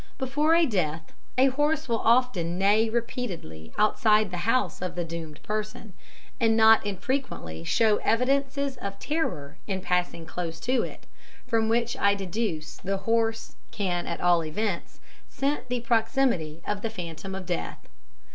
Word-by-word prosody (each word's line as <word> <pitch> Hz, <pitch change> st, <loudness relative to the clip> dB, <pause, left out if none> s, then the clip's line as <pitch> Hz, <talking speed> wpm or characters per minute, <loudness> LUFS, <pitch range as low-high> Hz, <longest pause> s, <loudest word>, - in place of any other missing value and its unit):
Before 295 Hz, +5 st, +2 dB
a 335 Hz, 0 st, +5 dB
death 165 Hz, -, -2 dB, 0.2 s
a 265 Hz, +1 st, +6 dB
horse 295 Hz, +3 st, 0 dB
will 230 Hz, -2 st, +1 dB
often 225 Hz, -8 st, +2 dB
neigh 210 Hz, +4 st, +4 dB
repeatedly 210 Hz, -, -4 dB
outside 215 Hz, -1 st, +3 dB
the 180 Hz, +5 st, -2 dB
house 255 Hz, -5 st, +1 dB
of 180 Hz, -1 st, -3 dB
the 175 Hz, -, -1 dB
doomed 165 Hz, -2 st, -7 dB
person, 215 Hz, -1 st, -4 dB, 0.5 s
and 225 Hz, -2 st, +3 dB
not 220 Hz, 0 st, +7 dB
infrequently 200 Hz, -, -3 dB
show 215 Hz, -, +3 dB
evidences 275 Hz, +3 st, +1 dB
of 200 Hz, -3 st, -5 dB
terror 245 Hz, -, -3 dB
in 190 Hz, -2 st, -1 dB
passing 180 Hz, -2 st, -1 dB
close 165 Hz, 0 st, -5 dB
to 255 Hz, +1 st, +1 dB
it, -, -, -7 dB, 0.4 s
from 225 Hz, -3 st, +1 dB
which 235 Hz, +1 st, +1 dB
I 200 Hz, 0 st, +3 dB
deduce 190 Hz, -5 st, -3 dB
the 195 Hz, +1 st, -2 dB
horse 225 Hz, +2 st, 0 dB
can 180 Hz, -4 st, -2 dB
at 170 Hz, -, -3 dB
all 175 Hz, -1 st, +4 dB
events 180 Hz, +4 st, -3 dB, 0.3 s
scent 275 Hz, -2 st, -2 dB
the 245 Hz, -1 st, -1 dB
proximity 225 Hz, -, +1 dB
of 205 Hz, -1 st, -2 dB
the 225 Hz, -, -2 dB
phantom 180 Hz, -1 st, -6 dB
of 190 Hz, -1 st, -6 dB
death. 80 Hz, -, -4 dB
215 Hz, 150 wpm, -27 LUFS, 175-240 Hz, 0.5 s, not